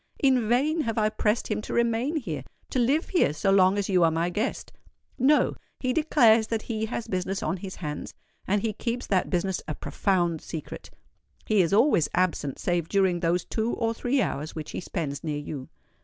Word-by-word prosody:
In 255 -5 +2
vain 300 +7 +2
have 230 -5 -2
I 215 -1 +3
pressed 215 +1 0
him 215 -1 -1
to - - -5
remain 235 +5 +1
here—to 170 - -5
live 275 +7 +2
here 345 - +2
so 195 +5 +1
long 190 0 +5
as 200 - -1
you 185 -3 +3
are 165 - +5
my 165 +2 0
guest: 215 +8 -3 0.5
no—he 260 -1 +1
declares 235 -8 +4
that 225 -1 -2
he 220 -2 -2
has 230 0 -4
business 190 +1 -2
on 190 - -1
his 185 +1 -7
hands; 150 -3 -6 0.3
and 200 +1 +1
he 220 -2 0
keeps 235 +3 -3
that 190 -2 +1
business 185 +1 -1
a 155 - -3
profound 175 -3 0
secret. 160 -3 -7 0.6
He 215 -3 +3
is 170 - +1
always 205 - +4
absent 170 -6 0
save 175 -2 -1
during 190 -3 +2
those 170 0 0
two 225 +1 -1
or 230 -1 0
three 245 +2 +1
hours 155 -3 -4
which 155 -2 -6
he - - -4
spends 155 -6 -4
near 150 -2 -2
you." 145 -2 -6
200 Hz, 190 wpm, -26 LUFS, 175-235 Hz, 0.6 s, long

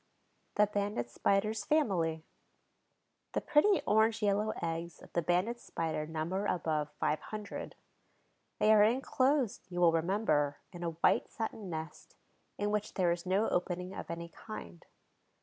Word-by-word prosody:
THE 210 - +5
BANDED 205 - -2
SPIDER'S 200 - +1
FAMILY 175 - +1 1.1
The - - 0
pretty 380 +7 +4
orange 220 +1 +3
yellow 205 +1 +2
eggs 165 0 -4
of - - -16
the 170 - +2
Banded 180 +8 +1
Spider 160 -6 -3
number 165 +6 -2
above 155 -3 0
five 155 - +1
hundred. 210 -2 -7 0.8
They 215 - +5
are 210 - +7
inclosed, 255 +2 +2
you 175 -1 -4
will 175 -1 +6
remember, 165 -4 +1
in 175 - -9
a 170 - -1
white - - +4
satin 220 -3 -5
nest, 160 -1 -7 0.4
in 205 0 0
which 210 0 -2
there 180 -3 +3
is 170 +1 -3
no 195 +4 +2
opening 180 +1 -1
of - - -7
any 170 0 -5
kind. 85 - -9
190 Hz, 145 wpm, -32 LUFS, 165-215 Hz, 1.1 s, are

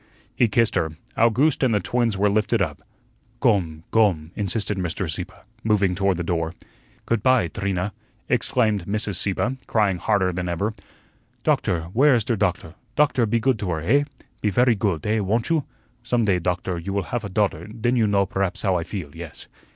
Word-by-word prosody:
He 120 - +4
kissed 115 +1 +2
her. 80 -1 0 0.2
Owgooste 125 +7 +3
and 125 -5 +3
the - - +3
twins 115 +3 0
were 105 +2 +3
lifted 110 +3 +1
up. 80 -7 -2 0.6
"Gome, 90 - +1
gome," 90 -8 +2
insisted 105 +1 -1
Mr. 90 +1 -2
Sieppe, 90 +4 -5 0.3
moving 105 -4 +2
toward 95 -1 +1
the 85 - -2
door. 85 0 -2 0.5
"Goot 115 -3 0
py, 130 -10 +3
Trina," 95 +3 -2 0.3
exclaimed 110 -6 +1
Mrs. 105 -2 -1
Sieppe, 115 +8 0
crying 100 -5 +1
harder 95 0 +1
than 90 0 -3
ever. 100 +6 -1 0.7
"Doktor 85 - +1
where 135 +3 +5
is 115 - +1
der 120 +1 0
doktor 90 -5 -1 0.2
Doktor, 135 -6 +3
pe 115 +2 +1
goot 125 -1 +1
to 100 - -3
her, 80 -3 -1
eh? 140 - +3 0.4
pe 105 - +2
vairy 120 +4 +4
goot, 95 -7 -1
eh, 110 +1 +1
won't 110 - 0
you? 160 -4 +1 0.4
Zum 120 -2 +1
day, 95 -3 +2
Dokter, 90 0 -2
you 95 - -4
vill 100 -1 0
haf 120 -2 -1
a 100 - -5
daughter, 95 -4 0
den 115 +3 -1
you 115 -3 +3
know 100 -1 +2
berhaps 95 -1 -2
how 95 -3 +2
I 85 - -2
feel, 85 -6 -7
yes." 85 -1 -9
100 Hz, 190 wpm, -23 LUFS, 90-115 Hz, 0.7 s, where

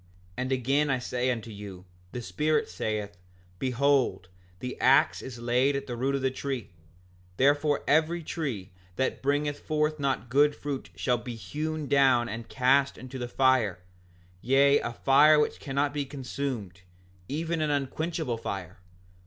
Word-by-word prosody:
5:52 - - -27
And 130 +1 -2
again 135 +3 +1
I 135 - +2
say 125 0 -1
unto 115 -2 -3
you, 100 -3 -9 0.3
the 125 - -5
Spirit 155 +5 0
saith: 100 +1 -4 0.4
Behold, 130 -8 +1 0.3
the 125 +4 -5
ax 135 +1 +4
is 130 -2 -8
laid 125 +4 +2
at 140 - -3
the 120 - -5
root 135 +3 0
of 135 - -2
the 130 - +2
tree; 130 -5 -4 0.7
therefore 145 +2 +3
every 160 +3 +2
tree 125 - -4 0.2
that 130 - -1
bringeth 145 +1 0
not - - -25
forth 150 -5 0
good 145 +2 +4
fruit 140 -2 -5
shall 125 -2 0
be 120 0 -7
hewn 155 +6 -4
down 130 -3 +4
and 115 +1 -6
cast 135 +2 +2
into 130 +1 -8
the 120 - -3
fire, 130 -7 +2 0.6
yea, 140 +3 +4
a 120 - -3
fire 145 +5 +5
which 150 - 0
cannot 140 +1 -1
be 145 -1 -1
consumed, 130 -9 -5 0.5
even 165 +3 -2
an 155 - +1
unquenchable 145 -1 -2
fire. 95 -4 -6
135 Hz, 155 wpm, -28 LUFS, 120-145 Hz, 0.7 s, fire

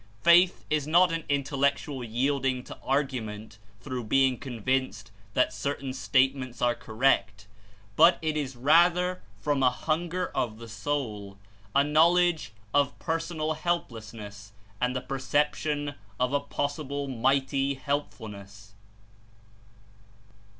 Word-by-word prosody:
Faith 175 +3 +5
is 150 -2 +1
not 175 +2 +5
an 165 -1 -2
Intellectual 140 -1 0
yielding 130 +2 0
to - - -9
argument 115 -7 -2 0.2
through 130 -3 -4
being 130 +3 +3
convinced 120 -4 -2 0.2
that 125 0 +2
certain 140 -2 -3
statements 130 -1 +1
are 120 -1 +2
correct, 110 -4 0 0.5
but 170 +6 +6
It 155 -1 -2
is 140 -4 -3
rather 175 +7 +3 0.2
from 140 +6 0
a 130 - +5
hunger 170 +7 -2
of 110 -3 -2
the 115 0 -10
soul, 110 -3 -4 0.4
a 140 - +6
knowledge 160 -2 +3 0.2
of 145 -2 +2
personal 165 -1 -2
helplessness 110 - -5 0.3
and 125 +1 +1
the 130 - -1
per 135 +1 -5
ception 145 +1 0 0.3
of 125 +2 +1
a 145 - +3
possible 145 0 -3
Mighty 135 +2 +1
Helpfulness. 105 -8 -5
135 Hz, 115 wpm, -27 LUFS, 120-150 Hz, 0.5 s, but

